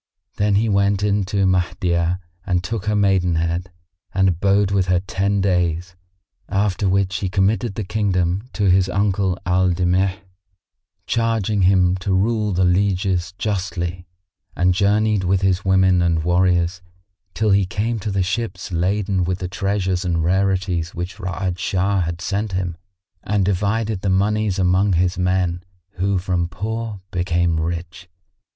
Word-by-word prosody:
Then 100 Hz, 0 st, +2 dB
he 110 Hz, +3 st, +2 dB
went 100 Hz, -1 st, +2 dB
in 100 Hz, -1 st, +1 dB
to 100 Hz, +1 st, 0 dB
Mahdiyah 90 Hz, -1 st, +1 dB, 0.3 s
and 90 Hz, -2 st, 0 dB
took 105 Hz, +1 st, -4 dB
her 105 Hz, 0 st, +1 dB
maidenhead 90 Hz, -3 st, +1 dB, 0.4 s
and 95 Hz, -1 st, +4 dB
abode 100 Hz, +3 st, +2 dB
with 95 Hz, -2 st, +1 dB
her 90 Hz, -1 st, +3 dB
ten 100 Hz, +2 st, -1 dB
days; 90 Hz, -2 st, 0 dB, 0.5 s
after 100 Hz, -1 st, 0 dB
which 95 Hz, 0 st, +1 dB
he 100 Hz, -3 st, -2 dB
committed 100 Hz, +3 st, 0 dB
the 110 Hz, -, -3 dB
kingdom 95 Hz, +1 st, -1 dB
to 105 Hz, -, -2 dB
his 95 Hz, 0 st, +3 dB
uncle 95 Hz, -1 st, 0 dB
Al 90 Hz, 0 st, +2 dB
Damigh, 90 Hz, +2 st, +1 dB, 0.9 s
charging 115 Hz, -3 st, 0 dB
him 90 Hz, -1 st, +4 dB
to 95 Hz, +1 st, -1 dB
rule 105 Hz, +2 st, +1 dB
the 95 Hz, 0 st, +2 dB
lieges 95 Hz, -1 st, 0 dB
justly, 90 Hz, -3 st, -3 dB, 0.5 s
and 90 Hz, +1 st, +2 dB
journeyed 105 Hz, +1 st, +2 dB
with 95 Hz, +1 st, +1 dB
his 95 Hz, 0 st, +1 dB
women 95 Hz, -1 st, +3 dB
and 85 Hz, -2 st, +1 dB
warriors, 90 Hz, +1 st, +1 dB, 0.5 s
till 110 Hz, -1 st, +1 dB
he 100 Hz, -1 st, +3 dB
came 110 Hz, +4 st, -2 dB
to 105 Hz, -, -4 dB
the 95 Hz, -1 st, 0 dB
ships 100 Hz, -1 st, -3 dB
laden 95 Hz, +2 st, 0 dB
with 90 Hz, +1 st, -1 dB
the 90 Hz, -, -4 dB
treasures 95 Hz, -1 st, -1 dB
and 85 Hz, -3 st, 0 dB
rarities 90 Hz, -2 st, 0 dB
which 90 Hz, +3 st, -5 dB
Ra'ad 90 Hz, -1 st, -3 dB
Shah 95 Hz, +1 st, 0 dB
had 85 Hz, 0 st, -3 dB
sent 100 Hz, +1 st, -2 dB
him, 90 Hz, -2 st, -2 dB, 0.5 s
and 100 Hz, -2 st, 0 dB
divided 105 Hz, +2 st, 0 dB
the 100 Hz, -, -1 dB
monies 105 Hz, +1 st, +1 dB
among 95 Hz, +1 st, +2 dB
his 90 Hz, +2 st, +1 dB
men 90 Hz, -1 st, 0 dB, 0.4 s
who 95 Hz, +2 st, +1 dB
from 90 Hz, -2 st, -1 dB
poor 110 Hz, +2 st, -4 dB
became 85 Hz, -2 st, 0 dB
rich. 85 Hz, +2 st, -5 dB
95 Hz, 150 wpm, -21 LUFS, 90-100 Hz, 0.9 s, and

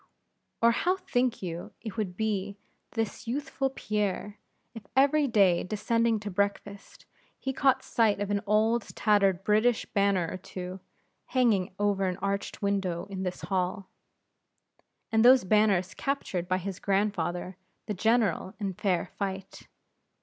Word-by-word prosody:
Or 235 Hz, -, +7 dB
how 360 Hz, +10 st, +1 dB
think 255 Hz, -, -1 dB
you 170 Hz, -1 st, -5 dB
it 220 Hz, -4 st, -7 dB
would 195 Hz, -5 st, -3 dB
be 205 Hz, -2 st, -2 dB, 0.3 s
with -, -, -25 dB
this 225 Hz, 0 st, -3 dB
youthful 275 Hz, +1 st, -1 dB
Pierre, 210 Hz, -4 st, -3 dB, 0.3 s
if 220 Hz, -4 st, -11 dB
every 285 Hz, +2 st, +4 dB
day 195 Hz, -7 st, +4 dB
descending 230 Hz, +3 st, +1 dB
to 205 Hz, -1 st, -5 dB
breakfast, 200 Hz, +1 st, -3 dB, 0.3 s
he 265 Hz, -, -3 dB
caught 265 Hz, 0 st, +2 dB
sight 220 Hz, -4 st, +2 dB
of 205 Hz, 0 st, -2 dB
an 200 Hz, -1 st, +1 dB
old 220 Hz, +3 st, +3 dB
tattered 195 Hz, -3 st, +3 dB
British 215 Hz, +3 st, +2 dB
banner 200 Hz, -4 st, +1 dB
or 185 Hz, -, -5 dB
two, 185 Hz, 0 st, -7 dB, 0.5 s
hanging 215 Hz, -8 st, +1 dB
over 200 Hz, -2 st, +1 dB
an 180 Hz, -1 st, -2 dB
arched 200 Hz, +1 st, -3 dB
window 190 Hz, -3 st, -1 dB
in 190 Hz, -1 st, -4 dB
his 180 Hz, -1 st, -4 dB
hall; 185 Hz, 0 st, -2 dB, 1.2 s
and 220 Hz, 0 st, +4 dB
those 255 Hz, +1 st, +7 dB
banners 195 Hz, -2 st, +2 dB
captured 195 Hz, -11 st, -2 dB
by 185 Hz, 0 st, +1 dB
his 190 Hz, 0 st, -5 dB
grandfather, 190 Hz, -3 st, -1 dB, 0.3 s
the 210 Hz, -, -3 dB
general, 220 Hz, -2 st, +1 dB
in 200 Hz, -2 st, -2 dB
fair 190 Hz, -3 st, 0 dB
fight? 195 Hz, -1 st, -5 dB
205 Hz, 140 wpm, -28 LUFS, 190-225 Hz, 1.2 s, Or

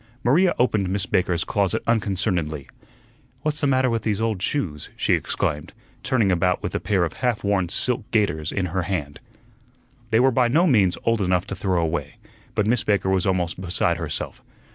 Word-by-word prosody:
Maria 170 Hz, +9 st, +3 dB
opened 105 Hz, -6 st, +1 dB
Miss 95 Hz, 0 st, 0 dB
Baker's 90 Hz, -2 st, +1 dB
closet 100 Hz, -2 st, 0 dB
unconcernedly. 95 Hz, -, -1 dB, 0.8 s
"What's 155 Hz, 0 st, 0 dB
the 145 Hz, -, +2 dB
matter 130 Hz, -1 st, +3 dB
with 115 Hz, -2 st, 0 dB
these 105 Hz, -2 st, -1 dB
old 110 Hz, -4 st, -1 dB
shoes?" 90 Hz, -, -2 dB
she -, -, +1 dB
exclaimed, 75 Hz, 0 st, -2 dB, 0.3 s
turning 115 Hz, -7 st, +2 dB
about 90 Hz, 0 st, +1 dB
with -, -, -3 dB
a -, -, 0 dB
pair 95 Hz, -4 st, +1 dB
of 80 Hz, -, -2 dB
half 125 Hz, -4 st, 0 dB
worn 100 Hz, -4 st, +1 dB
silk 120 Hz, +3 st, -1 dB
gaiters 80 Hz, -9 st, 0 dB
in 95 Hz, -, -1 dB
her 95 Hz, -, +1 dB
hand. 75 Hz, -6 st, -3 dB, 0.9 s
They 110 Hz, 0 st, +3 dB
were 130 Hz, +2 st, +4 dB
by 125 Hz, 0 st, +3 dB
no 155 Hz, +9 st, +3 dB
means 105 Hz, -, +3 dB
old 115 Hz, -2 st, +1 dB
enough 90 Hz, -1 st, +1 dB
to 100 Hz, -, -5 dB
throw 95 Hz, -1 st, 0 dB
away, 80 Hz, -3 st, -2 dB, 0.4 s
but 105 Hz, -, +1 dB
Miss 115 Hz, +1 st, +1 dB
Baker 100 Hz, -2 st, +1 dB
was 95 Hz, -1 st, +1 dB
almost 90 Hz, -1 st, -1 dB
beside 90 Hz, -1 st, 0 dB
herself. -, -, -5 dB
100 Hz, 185 wpm, -23 LUFS, 90-115 Hz, 0.9 s, were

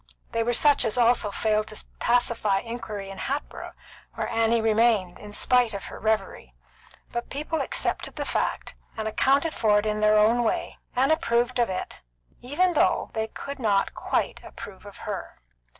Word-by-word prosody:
They 230 Hz, -, 0 dB
were 235 Hz, +1 st, +1 dB
such 285 Hz, +3 st, +4 dB
as 225 Hz, 0 st, 0 dB
also 235 Hz, -3 st, +3 dB
failed 215 Hz, +1 st, 0 dB
to 215 Hz, -, -6 dB
pacify 230 Hz, -5 st, +2 dB
inquiry 215 Hz, -4 st, -6 dB
in 195 Hz, -, -9 dB
Hatboro', 280 Hz, +3 st, -4 dB, 0.4 s
where -, -, -2 dB
Annie 230 Hz, +1 st, +2 dB
remained, 220 Hz, -4 st, +2 dB
in 210 Hz, -, -10 dB
spite 245 Hz, 0 st, +2 dB
of 195 Hz, -, -5 dB
her -, -, -9 dB
reverie; 195 Hz, -, -2 dB, 0.6 s
but 240 Hz, 0 st, -4 dB
people 305 Hz, +3 st, -2 dB
accepted -, -, -2 dB
the -, -, -3 dB
fact, -, -, -2 dB, 0.2 s
and 220 Hz, 0 st, -2 dB
accounted 280 Hz, +8 st, +2 dB
for 210 Hz, -2 st, +3 dB
it 205 Hz, -, +1 dB
in 210 Hz, 0 st, 0 dB
their 215 Hz, 0 st, +4 dB
own 225 Hz, +3 st, +4 dB
way, 225 Hz, -, -2 dB, 0.2 s
and 265 Hz, +4 st, +3 dB
approved 245 Hz, -4 st, +1 dB
it, 190 Hz, -6 st, -2 dB, 0.4 s
even 330 Hz, +9 st, +1 dB
though 300 Hz, -, +2 dB
they 220 Hz, 0 st, -1 dB
could 280 Hz, +5 st, -7 dB
not 205 Hz, -5 st, +1 dB
quite -, -, -1 dB
approve -, -, -10 dB
her. -, -, -7 dB
230 Hz, 165 wpm, -26 LUFS, 215-245 Hz, 0.6 s, such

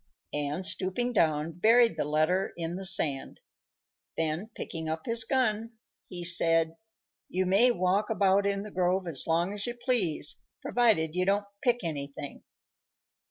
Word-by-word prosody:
and, 150 Hz, +5 st, -2 dB
stooping 200 Hz, +8 st, 0 dB
down, 155 Hz, -5 st, +1 dB
buried 225 Hz, +5 st, +4 dB
the 160 Hz, -, -1 dB
letter 155 Hz, +6 st, 0 dB
in 170 Hz, 0 st, -3 dB
the 190 Hz, 0 st, -1 dB
sand. 145 Hz, -6 st, +1 dB, 0.8 s
Then, 160 Hz, +6 st, -2 dB
picking 160 Hz, -1 st, -4 dB
up 160 Hz, 0 st, -4 dB
his 230 Hz, 0 st, +1 dB
gun, 225 Hz, -2 st, -1 dB, 0.4 s
he 175 Hz, -2 st, -5 dB
said, 165 Hz, -2 st, +3 dB, 0.5 s
"You 185 Hz, +1 st, -1 dB
may 200 Hz, +7 st, +5 dB
walk 190 Hz, 0 st, 0 dB
about 200 Hz, -2 st, +2 dB
in 200 Hz, 0 st, -1 dB
the 210 Hz, -, -9 dB
grove 185 Hz, +1 st, 0 dB
as 160 Hz, -6 st, 0 dB
long 170 Hz, +4 st, +1 dB
as 205 Hz, +2 st, -4 dB
you 240 Hz, -, -4 dB
please, 195 Hz, -, -1 dB, 0.2 s
provided 215 Hz, -11 st, +1 dB
you 180 Hz, +1 st, 0 dB
don't 200 Hz, +1 st, +1 dB, 0.2 s
pick 245 Hz, -3 st, +1 dB
anything." 145 Hz, -3 st, -5 dB
185 Hz, 150 wpm, -28 LUFS, 160-210 Hz, 0.8 s, may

